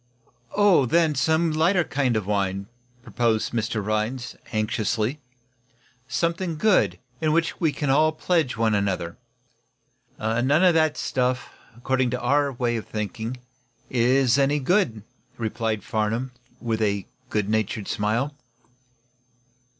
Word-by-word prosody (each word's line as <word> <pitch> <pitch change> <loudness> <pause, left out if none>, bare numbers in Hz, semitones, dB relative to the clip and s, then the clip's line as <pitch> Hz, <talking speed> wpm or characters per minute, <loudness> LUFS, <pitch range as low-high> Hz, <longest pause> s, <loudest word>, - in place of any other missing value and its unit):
"Oh, 200 -10 +5
then, 165 +3 +3
some 160 +4 +2
lighter 170 +4 +3
kind 135 -6 0
of 105 - -2
wine," 100 -1 -1 0.4
proposed 115 -2 0
Mr. 110 -2 -1
Rhinds, 110 +4 -2 0.2
anxiously. 110 +4 -1 0.9
"Something 170 +3 -1
good, 150 - +3 0.2
in 155 -1 +2
which 165 0 0
we 160 -3 +3
can 145 -1 -1
all 155 +3 +4
pledge 155 -5 0
one 110 -1 +2
another." 95 -4 -1 1.0
"None 115 +4 0
of 170 +5 +5
that 155 -2 +2
stuff, 125 -1 -1 0.3
according 130 +1 0
to 125 +1 -2
our 140 +3 +2
way 120 -2 -1
of 110 - -6
thinking, 110 +3 -4 0.5
is 125 +1 +3
any 140 +2 +3
good," 140 - +1 0.3
replied 110 -2 -2
Farnum, 110 +4 -1 0.3
with 115 -2 -2
a 100 -3 0 0.2
good 105 -2 0
natured 110 -1 -1
smile. 115 +8 -1
120 Hz, 125 wpm, -24 LUFS, 110-150 Hz, 1.0 s, Oh